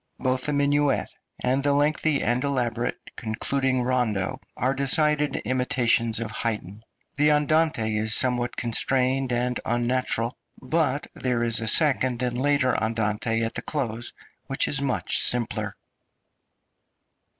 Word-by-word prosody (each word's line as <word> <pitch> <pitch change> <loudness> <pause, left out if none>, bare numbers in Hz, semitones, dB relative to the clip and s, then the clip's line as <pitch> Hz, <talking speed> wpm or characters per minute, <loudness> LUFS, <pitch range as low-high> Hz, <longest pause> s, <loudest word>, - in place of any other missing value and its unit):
Both 130 +1 0
the 150 - 0
minuet 145 -1 +1 0.3
and 130 +2 +1
the 145 0 +2
lengthy 150 0 +1
and 120 +1 0
elaborate 125 -4 -1 0.2
concluding 130 +3 -1
rondo 120 -7 -1 0.2
are 130 +2 +1
decided 150 +2 +2
imitations 120 -2 +1
of 115 -1 -4
Haydn. 105 -3 -4 0.4
The 150 +1 +4
andante 150 -7 +1
is 110 +1 +2
somewhat 125 -2 +1
constrained 130 +2 +1
ami 125 +1 0
unnatural, 120 0 0 0.2
but 145 0 0
there 125 -2 -1
is 115 -1 +3
a 110 - -3
second 130 -2 +2
and 125 -1 -1
later 140 -2 +2
andante 110 0 0
at 115 - -2
the - - -3
close, 120 -6 -3 0.3
which 135 - 0
is 135 - 0
much 135 -3 0
simpler. 120 -2 0
125 Hz, 130 wpm, -25 LUFS, 115-140 Hz, 0.4 s, The